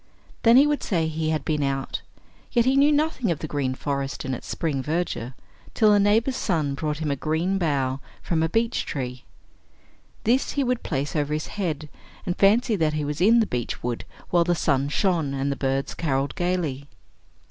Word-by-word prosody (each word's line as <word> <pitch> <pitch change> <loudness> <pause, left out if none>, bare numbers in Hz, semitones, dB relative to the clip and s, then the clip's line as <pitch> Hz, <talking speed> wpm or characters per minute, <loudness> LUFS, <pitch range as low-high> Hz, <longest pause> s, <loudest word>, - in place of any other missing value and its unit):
Then 230 +1 +6
he 280 - +7
would 295 -1 0
say 165 -6 0
he 160 0 -2
had 155 -1 -1
been 150 -2 0
out, 135 -1 -2 0.5
yet 235 -2 +3
he 260 +1 +3
knew 285 +2 +5
nothing 295 -6 +1
of 170 - +1
the 155 - -5
green 135 -3 -1
forest 140 -1 -3
in 130 - -2
its 125 - -6
spring 150 -5 -2
verdure, 150 -5 -2 0.4
till 215 -2 +5
a 205 - +5
neighbor's 225 +6 +3
son 160 - 0
brought 150 +1 -2
him 155 -2 -2
a - - +1
green 160 +7 0
bough 135 -5 0 0.2
from 165 -2 0
a 160 - +1
beech 225 +4 0
tree. 125 -2 -5 1.0
This 245 +4 +2
he 285 - +1
would 250 -1 0
place 145 0 -3
over 150 -1 0
his 155 - -3
head, 160 -7 -2 0.4
and 175 - -1
fancy 220 +4 +4
that 160 -5 +1
he 150 -1 -1
was 150 +3 -3
in 230 +5 +6
the - - +2
beech 125 - -4
wood 120 -1 -2 0.3
while 175 -1 +4
the 175 +1 +1
sun 140 -3 +1
shone, 160 -4 +1
and 135 +1 -1
the - - -1
birds 135 0 -1
carolled 140 -4 -1
gayly. 170 -6 -2
160 Hz, 200 wpm, -24 LUFS, 140-205 Hz, 1.0 s, he